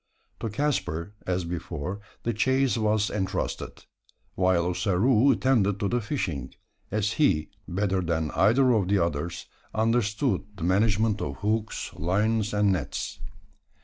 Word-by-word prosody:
To 115 - -3
Caspar, 100 - -1
as 90 -1 0
before, 85 +2 -4 0.2
the 120 - 0
chase 130 +4 +2
was 110 -2 +1
entrusted; 95 -2 -3 0.5
while 90 -2 +2
Ossaroo 105 +8 +3
attended 105 -8 +2
to 105 - 0
the 120 0 0
fishing; 90 - -3 0.3
as 105 0 0
he, 95 - +2 0.2
better 95 +1 0
than 80 -3 -1
either 125 +6 +4
of 105 -6 +2
the 100 +1 +3
others, 85 -1 -2 0.3
understood 110 -1 +1
the 95 - -7
management 105 +3 +2
of 70 -1 -3
hooks, 110 +4 -2
lines, 105 +6 0
and 105 -1 +3
nets. 95 - -3
100 Hz, 130 wpm, -27 LUFS, 90-110 Hz, 0.5 s, either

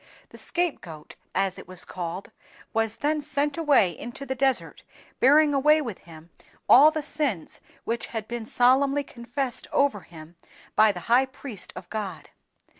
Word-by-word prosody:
The - - -14
scape 350 -3 -1
goat 155 -4 -11 0.2
(as 195 -1 0
it - - -12
was 185 0 -8
called), 180 +1 -6 0.4
was 225 -1 0
then 300 +5 0
sent 290 0 -1
away 285 - +3
into 240 - -8
the 265 - -2
desert, 265 0 0 0.4
bearing 295 +3 +5
away 300 +3 +4
with 235 -10 -5
him 165 -1 -15 0.4
all 285 +5 +8
the 310 -1 -4
sins 280 - -3 0.2
which 230 +1 -3
had 220 -2 -5
been 235 -2 -5
solemnly 270 +4 +3
confessed 245 +1 -5
over 280 -7 +2
him 165 -1 -14 0.4
by 215 0 +6
the 180 -3 -8
high 245 +6 +3
priest 260 -6 -8
of 175 - -9
God. 200 -6 -5
240 Hz, 160 wpm, -26 LUFS, 195-285 Hz, 0.4 s, all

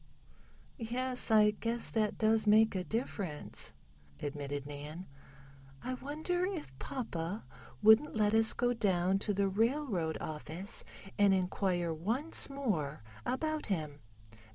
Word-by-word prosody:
"Yes, 250 +2 -1
I 210 -1 +6
guess 230 +2 -2
that 215 -2 0
does 220 0 +3
make 220 +1 +6
a 185 -2 -1
difference," 185 - -3 0.5
admitted 145 -1 -4
Nan. 150 +5 -7 0.8
"I 255 - -2
wonder 310 +7 -2
if 360 - -4
papa 200 -5 -4 0.4
wouldn't 220 +8 +6
let 210 -1 +2
us 225 0 +5
go 245 0 +1
down 190 -4 +2
to 210 - 0
the 200 0 +2
railroad 215 - 0
office 160 +5 -2 0.4
and 200 -1 +6
inquire 180 -2 0
once 230 - +1
more 175 - -2 0.2
about 310 +3 -1
him? 155 -7 -2
210 Hz, 120 wpm, -33 LUFS, 175-245 Hz, 0.8 s, I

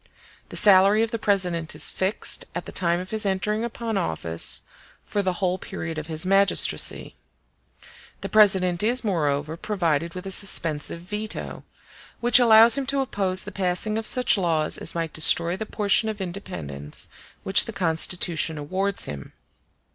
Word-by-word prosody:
The - - -10
salary 200 +2 +5
of 225 - -3
the 230 - -3
President 180 -6 -1
is - - 0
fixed, 190 +3 -1
at - - -5
the - - -8
time 170 -1 0
of 185 +1 -8
his 220 -1 -3
entering 205 +3 -2
upon 230 -3 -3
office, 80 - -2 0.4
for 205 - -2
the 185 -2 -1
whole 185 0 -2
period 160 -2 -6
of 155 - -8
his 160 +1 -4
magistracy. 195 +1 +1 1.1
The - - -5
President 190 -5 +3
is, 240 +4 +1
moreover, 155 -6 -1
provided 170 -5 -2
with 180 +1 -7
a 195 - -4
suspensive 170 -5 +1
veto, 210 +4 -6 0.5
which 240 +1 +5
allows 230 +2 +7
him 270 - -5
to 275 0 0
oppose 195 -7 -1
the 205 - -9
passing 190 +2 -2
of 220 0 -2
such 250 -5 +2
laws 160 -4 0
as - - -2
might 165 -2 -3
destroy 170 +2 +3
the 215 +3 -6
portion 210 +1 +1
of 215 -1 -6
independence 80 - -5 0.4
which 195 - +6
the - - -6
Constitution 165 -3 -1
awards 190 +7 -2
him. 70 -2 -9
190 Hz, 160 wpm, -23 LUFS, 165-210 Hz, 1.1 s, allows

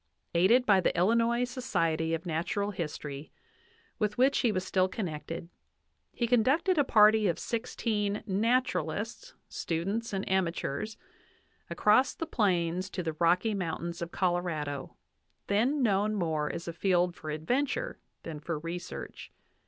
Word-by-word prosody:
Aided 210 +9 +4
by 195 -4 +5
the 175 - 0
Illinois 230 +6 +3
Society 165 - 0
of 165 - -7
Natural 180 +5 -1
History, 150 -5 -6 0.7
with 210 -1 0
which 265 +3 +4
he 235 - +2
was 185 -2 -1
still 185 -1 +2
connected, 170 -4 -5 0.6
he 240 - -1
conducted 270 - +3
a - - +5
party 215 -3 +5
of 170 - 0
sixteen 215 -3 -2
"naturalists, 245 - -1
students, 195 +8 -2
and 195 -1 -3
amateurs" 190 +2 -1 0.7
across 235 +6 +3
the 330 - -3
plains 185 - 0
to 185 - -4
the 160 -1 -2
Rocky 175 +7 +2
Moun 180 -5 -2
tains 170 - -10
of 170 - -3
Colorado, 170 -6 -2 0.5
then 250 +8 +2
known 210 -1 +2
more 160 -6 -1
as 170 - -6
a 170 - -3
field 180 0 +2
for 155 - -8
adventure 265 - -1 0.2
than 160 -2 -6
for 160 +1 -3
research. 170 +3 -7
190 Hz, 135 wpm, -30 LUFS, 170-230 Hz, 0.7 s, by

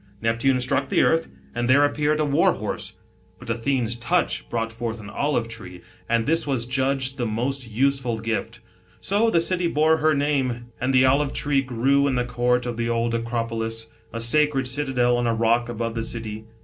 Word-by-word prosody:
Neptune 115 +4 +1
struck 130 +2 0
the - - +3
earth, 165 0 +2 0.3
and 120 0 -2
there 140 +3 +6
appeared 150 +1 0
a 155 - +2
war 140 -1 +3
horse; - - -5 0.4
but 115 - -6
Athene's 120 0 0
touch 165 +10 -1
brought 115 -1 -2
forth 115 0 -4
an 100 -2 -9
olive 140 -5 -1
tree, 95 -6 -10 0.3
and 115 -1 +2
this 165 0 +1
was 130 -4 0
judged 135 +1 0
the 120 - 0
most 125 +3 -2
useful 125 0 0
gift. 110 0 -3 0.4
So 210 +4 +1
the 170 - +3
city 175 +1 0
bore 160 0 +3
her 155 0 +2
name, 130 -5 -1
and 130 +2 +1
the 130 0 +5
olive 140 +2 +2
tree 145 -2 +1
grew 135 +3 +1
in 135 - 0
the 125 -1 0
court 125 0 0
of 120 -2 -4
the 115 0 -1
old 115 0 0
Acropolis, 115 -1 -2 0.2
a 115 - -5
sacred 135 +3 +2
citadel 125 -3 +1
on 120 0 0
a 115 - +1
rock 115 +1 +1
above 115 -1 -3
the 115 0 -3
city. 110 -2 -4
125 Hz, 190 wpm, -23 LUFS, 115-140 Hz, 0.4 s, there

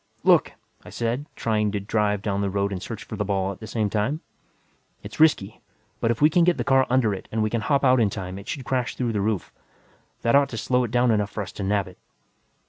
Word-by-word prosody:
"Look," - - +4 0.3
I - - -11
said, 120 +5 -2
trying 105 -2 0
to 105 - 0
drive 105 0 0
down 100 -1 -1
the 100 - 0
road 100 +1 -1
and 95 -2 -4
search 110 +1 -6
for - - -7
the 105 - -1
ball 100 -1 -1
at 95 - -10
the 110 - -8
same 110 -2 -1
time. 110 +10 -1 0.8
"It's - - -9
risky, 115 -10 +3 0.4
but 115 - 0
if 120 +4 0
I - - +9
can 170 +2 +3
get 175 0 +3
the - - -1
car 135 0 +3
under 125 -4 +2
it 95 - -7
and 110 0 0
we 110 - -1
can 115 - 0
hop 140 +4 +1
out 130 -1 +5
in 110 -3 +3
time, 95 -1 -6
it 100 - -12
should 135 -5 -5
crash 125 -1 -1
through 120 -3 -1
the 105 - 0
roof. 105 -2 -2 0.7
That 115 - +2
ought 140 0 +4
to 115 - -6
slow 125 +2 +1
it - - -5
down 120 +1 +3
enough 105 -2 +1
for 105 - -4
us 95 - -9
to 100 - -6
nab 100 0 0
it." 90 - -14
110 Hz, 255 wpm, -24 LUFS, 100-125 Hz, 0.8 s, I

